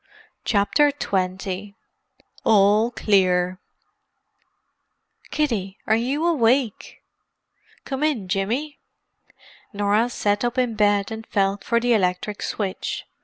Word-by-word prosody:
CHAPTER 220 +8 +3
XX 190 -4 -3 0.7
ALL 210 +1 +4
CLEAR 185 -5 +1 1.7
"Kiddie, 215 -10 -1
are 220 - +3
you 265 +8 -1
awake?" 255 -7 +1 0.8
"Come 270 0 -4
in, 285 -11 0
Jimmy." 230 +10 -2 0.9
Norah 205 +3 +1
sat 205 -3 0
up 240 +1 -1
in 250 -2 +1
bed 205 -1 +2
and 220 0 -7
felt 195 -1 0
for 235 - +1
the 240 0 +2
electric 195 0 0
switch. 195 -3 -3
210 Hz, 100 wpm, -23 LUFS, 195-245 Hz, 1.7 s, ALL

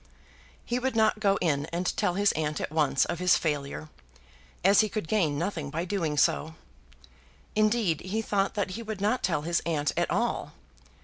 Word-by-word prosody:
He 240 +1 -1
would 260 -1 -1
not 220 -1 +3
go 200 -2 +2
in 145 -3 0
and 175 +2 -2
tell 175 - 0
his 205 +1 +3
aunt 150 -1 -2
at - - -4
once 150 -4 +2
of 170 - -4
his 180 0 +4
failure, 150 0 -3 0.7
as 195 +2 +6
he 215 - +4
could 215 -6 -4
gain 160 -9 +1
nothing 165 -3 -3
by 165 +4 -3
doing 170 -6 -1
so. 160 +2 +2 1.0
Indeed, 215 -6 +2
he 210 +5 -2
thought 200 -1 0
that 205 -2 -1
he 225 - -5
would 215 -3 -5
not 215 +6 +1
tell 170 -5 0
his 170 +2 0
aunt 150 -3 0
at - - 0
all. - - -1
180 Hz, 185 wpm, -28 LUFS, 155-210 Hz, 1.0 s, as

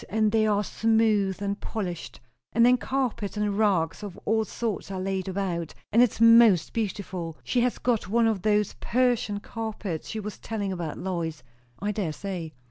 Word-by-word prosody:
And 215 0 +2
they 220 0 +3
are 205 -1 +2
smooth 215 -3 +1
and 200 +1 -2
polished; 180 -7 -5 0.3
and 230 +1 +5
then 250 +1 +6
carpets 245 -6 -2
and 210 -1 0
rugs 195 -6 +1
of 205 -3 -7
all 220 +1 +2
sorts 220 -1 -3
are 190 -1 -4
laid 190 0 -2
about; 180 -4 -3 0.2
and 230 - +5
it's 245 -3 +2
most 230 -6 +6
beautiful. 185 -6 -3
She 245 - +1
has 245 0 +1
got 230 -7 0
one 230 +2 +3
of 220 -4 +1
those 210 0 +2
Persian 240 -4 +1
carpets 210 -8 -5
she 220 - -3
was 210 -1 -6
telling 205 -3 -3
about, 170 -4 -4
Lois." 170 -4 -3 0.3
"I 205 +1 -2
dare 190 -7 -2
say." 180 -3 -5
205 Hz, 175 wpm, -26 LUFS, 190-225 Hz, 0.3 s, then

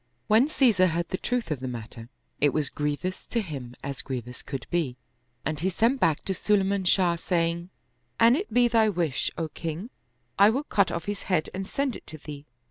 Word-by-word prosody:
When 225 +6 +5
Caesar 230 -11 +4
heard 170 0 -1
the 185 - -2
truth 245 -7 -1
of 150 - -1
the 130 - -4
matter, 115 -1 -7 0.3
it 145 -2 +3
was 150 -3 0
grievous 150 +5 -3
to 235 - 0
him 140 - -6
as 140 -1 -3
grievous 125 -2 -6
could 135 -3 -6
be, 155 -8 0 0.5
and 155 0 -1
he 185 +4 +1
sent 230 +8 +2
back 155 -9 +2
to 195 - 0
Sulayman 195 -1 +1
Shah, 180 -2 +4
saying, 170 0 -1 0.2
" 120 0 -45
An 235 +2 +7
it 390 +8 -3
be 245 0 +5
thy 225 -2 +4
wish, 170 -8 0
O 165 - -1
king, 165 - -5 0.5
I 200 +1 +8
will 265 +6 0
cut 200 -9 +2
off 170 - -3
his 205 0 -3
head 170 -4 +1
and 190 0 -4
send 275 0 -1
it - - -11
to 155 - -8
thee." 145 -1 -9
175 Hz, 210 wpm, -27 LUFS, 145-210 Hz, 0.5 s, I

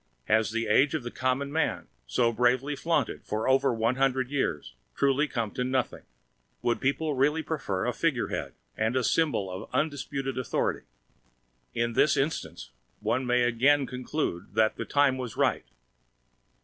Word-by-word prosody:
Has 110 +1 +2
the 115 +1 -1
age 140 +8 +3
of 150 - -2
the 120 - -5
Common 130 +2 -1
Man, 160 +1 -1 0.2
so 115 - +2
bravely 125 +5 +1
flaunted 150 -3 -1
for 110 +1 -2
over 135 0 +4
one 115 +2 0
hundred 130 -1 +1
years, 75 - -2 0.2
truly 140 +2 +2
come 115 -6 -2
to 125 - -2
nothing? 130 0 -1 0.6
Would 120 - 0
people 145 +3 0
really 150 +4 +2
prefer 100 -14 -2
a - - 0
figurehead - - -1 0.2
and 110 +3 0
a 130 - +2
symbol 135 - +1
of 90 +1 -7
undisputed 135 -3 -2
authority? 125 - -1 0.9
In 115 0 0
this 145 +5 +3
instance, 85 - -3 0.3
one 120 +4 -1
may 125 0 +3
again 135 +4 +3
conclude 125 - -4
that 110 0 +3
"the - - -4
time 140 -2 +2
was 125 -4 -5
right." - - +1
130 Hz, 155 wpm, -28 LUFS, 115-140 Hz, 0.9 s, over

